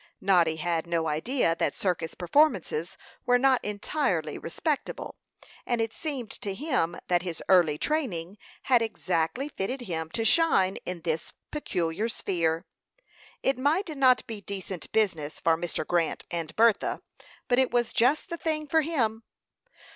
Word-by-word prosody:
Noddy 175 -4 +3
had 165 +1 -1
no 165 -1 0
idea 165 - +1
that - - +1
circus 175 -4 -1
performances 190 - +1 0.3
were 245 0 +5
not 260 0 +3
entirely 200 - -1
respectable; 285 - -3 0.5
and 240 -1 -1
it 225 0 -1
seemed 275 -8 -4
to 200 -2 -4
him 240 - 0
that 175 -1 +2
his 175 -2 -5
early 175 -6 +5
training 205 - -2 0.2
had 250 -3 +4
exactly 215 - -1
fitted 255 0 -4
him 160 -7 -3
to 225 -1 -1
shine 215 - +4
in 180 -2 -4
this 160 -1 -2 0.2
peculiar 195 - -1
sphere. 165 -6 -1 0.8
It 270 -1 +1
might 315 +5 +1
not 260 -2 +4
be 220 -3 -6
decent 190 -2 -6
business 170 -9 0
for 165 -1 +3
Mr. 165 -1 -3
Grant 170 -1 0
and 165 -2 -4
Bertha, 225 -2 +3 0.5
but 245 0 +3
it 260 - +3
was 240 -1 0
just 270 +10 +2
the 340 - -3
thing 310 -2 -1
for 320 +2 +3
him. 240 -9 0
200 Hz, 145 wpm, -27 LUFS, 170-260 Hz, 0.8 s, were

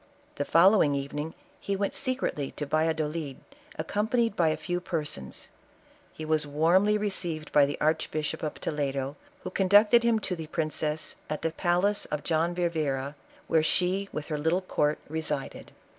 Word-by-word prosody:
The 145 - -1
follow 190 +6 +6
ing 145 -1 +3
evening 145 +3 -4 0.2
he 200 - -2
went 200 0 -1
secretly 255 - -1
to 150 - -4
Yalludolid, 155 -1 -1 0.4
accompa 210 +4 -1
nied 230 -3 +2
by 170 - +3
a 155 - 0
few 175 +3 -2
persons; 155 - -5 0.6
he 155 - -7
was 155 -1 +1
warmly 175 +8 +3
received 175 -7 -2
by 145 -1 +5
the 145 - -4
Archbishop 155 0 0
of 155 - -3
Toledo, 140 -2 -2 0.3
who 185 - -5
conducted 205 +5 +5
him 235 -1 +3
to 190 -3 -2
the 160 -2 -7
princess, 155 -1 -2
at 155 - -3
the 165 - +1
palace 180 +5 +1
of 150 -1 -4
John 165 +1 +1
Vivero, 150 -6 -1 0.3
where 160 - +3
she 185 +5 +1
with 150 - -4
her 150 -2 -3
little 165 +5 +1
court 150 -5 0
resided. 155 -2 -4
160 Hz, 160 wpm, -28 LUFS, 150-185 Hz, 0.6 s, follow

